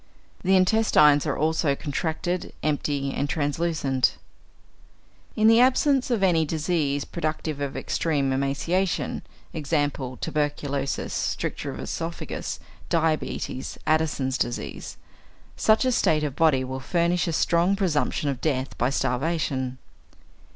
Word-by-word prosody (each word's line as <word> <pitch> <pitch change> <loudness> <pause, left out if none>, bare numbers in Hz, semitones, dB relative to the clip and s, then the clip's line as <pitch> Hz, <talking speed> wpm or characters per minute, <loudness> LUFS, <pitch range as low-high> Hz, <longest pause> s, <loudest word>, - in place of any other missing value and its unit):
The 190 +1 +3
intestines 185 -7 +4
are - - -1
also 155 -1 +1
contracted, 160 +5 -3
empty, 145 -2 -1
and 145 - -2
translucent. 145 -4 0 1.2
In 215 0 +4
the 225 +1 +7
absence 265 +1 +3
of 230 -5 +1
any 170 -4 +4
disease 155 -2 -1
productive 155 -3 -3
of 140 -1 -3
extreme 140 -5 0
emaciation 140 +8 -1 0.3
(e.g., 150 -2 +1 0.3
tuberculosis, 145 -2 -2
stricture - - -2
of - - -6
oesophagus, 165 +1 -4 0.3
diabetes, 160 -5 -1
Addison's 150 -5 +1
disease), 120 - -4 0.6
such 220 +4 +3
a 255 - +3
state 155 -9 +2
of 145 -3 -2
body 150 -5 +3
will 130 +1 -4
furnish 170 +5 +1
a - - 0
strong 170 +4 +2
presumption 165 -6 0
of 135 -3 -2
death 135 -4 -1
by 125 - +2
starvation. 135 -1 -1
155 Hz, 115 wpm, -25 LUFS, 140-170 Hz, 1.2 s, the